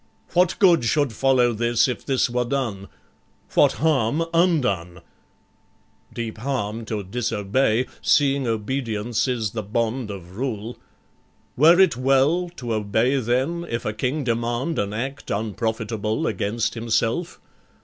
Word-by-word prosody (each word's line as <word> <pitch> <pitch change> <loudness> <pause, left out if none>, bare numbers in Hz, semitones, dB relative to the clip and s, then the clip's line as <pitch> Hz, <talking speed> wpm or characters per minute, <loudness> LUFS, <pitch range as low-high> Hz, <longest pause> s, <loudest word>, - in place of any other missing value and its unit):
What 180 0 +3
good 175 -8 +5
should 135 +1 +1
follow 125 0 +3
this, 120 +2 +2
if 125 - -4
this 135 -2 +1
were 125 0 0
done? 120 -7 -3 0.7
What - - +5
harm, 150 0 +1
undone? 115 - +1 1.1
Deep 115 -2 -5
harm 115 -3 -3
to 105 -2 -3
disobey, 110 +3 0 0.2
Seeing 140 -2 +2
obedience 115 0 -1
is 115 -5 -1
the 110 - -3
bond 115 +3 -2
of 95 -2 -9
rule. 120 -2 -4 0.8
Were 165 +6 +6
it 190 -10 +5
well 135 +7 +2
to 120 -6 -4
obey 110 +5 +1
then, 130 +8 -1
if 115 0 -3
a 105 - -1
king 130 +7 -2
demand 120 +5 -1
An 100 0 -1
act 135 +6 -5
unprofitable, 110 0 -2
against 105 +2 -1
himself? 115 +8 -1
120 Hz, 130 wpm, -23 LUFS, 110-135 Hz, 1.1 s, Were